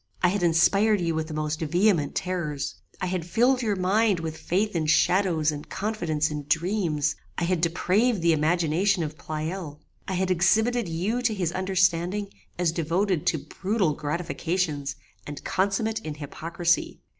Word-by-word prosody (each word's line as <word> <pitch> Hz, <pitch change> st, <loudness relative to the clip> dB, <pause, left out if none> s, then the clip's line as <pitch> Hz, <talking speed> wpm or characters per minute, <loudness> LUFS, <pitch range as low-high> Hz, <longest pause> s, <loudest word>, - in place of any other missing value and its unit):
I 180 Hz, -, +6 dB
had 200 Hz, +1 st, -1 dB
inspired 195 Hz, +5 st, +4 dB
you 170 Hz, -2 st, 0 dB
with 160 Hz, 0 st, -2 dB
the 155 Hz, -, -6 dB
most 155 Hz, 0 st, -2 dB
vehement 170 Hz, -1 st, +2 dB
terrors: 150 Hz, -6 st, -2 dB, 0.3 s
I -, -, -2 dB
had 180 Hz, -1 st, -2 dB
filled 245 Hz, +9 st, +2 dB
your 215 Hz, -4 st, 0 dB
mind 195 Hz, +1 st, +2 dB
with 160 Hz, -1 st, -4 dB
faith 195 Hz, +5 st, -1 dB
in 160 Hz, -2 st, 0 dB
shadows 165 Hz, -1 st, +3 dB
and 145 Hz, 0 st, -8 dB
confidence 170 Hz, -7 st, -1 dB
in 150 Hz, -1 st, -4 dB
dreams: 160 Hz, -3 st, 0 dB, 0.2 s
I -, -, -1 dB
had 175 Hz, -1 st, 0 dB
depraved 190 Hz, +5 st, +1 dB
the 170 Hz, -1 st, +5 dB
imagination 170 Hz, +4 st, +2 dB
of 155 Hz, 0 st, -5 dB
Pleyel: 155 Hz, 0 st, -5 dB, 0.3 s
I 190 Hz, -, -2 dB
had 185 Hz, 0 st, 0 dB
exhibited 215 Hz, +5 st, +2 dB
you 195 Hz, +9 st, -1 dB
to 225 Hz, -3 st, +1 dB
his 180 Hz, -4 st, -1 dB
understanding 185 Hz, +1 st, +1 dB, 0.3 s
as 175 Hz, -2 st, +1 dB
devoted 170 Hz, +2 st, 0 dB
to 160 Hz, -5 st, 0 dB, 0.2 s
brutal 195 Hz, -5 st, +1 dB
gratifications 155 Hz, -1 st, -2 dB, 0.3 s
and 145 Hz, -1 st, -7 dB
consummate 205 Hz, +4 st, 0 dB
in 155 Hz, -8 st, -6 dB
hypocrisy. 170 Hz, +4 st, -1 dB
175 Hz, 155 wpm, -26 LUFS, 155-195 Hz, 0.3 s, I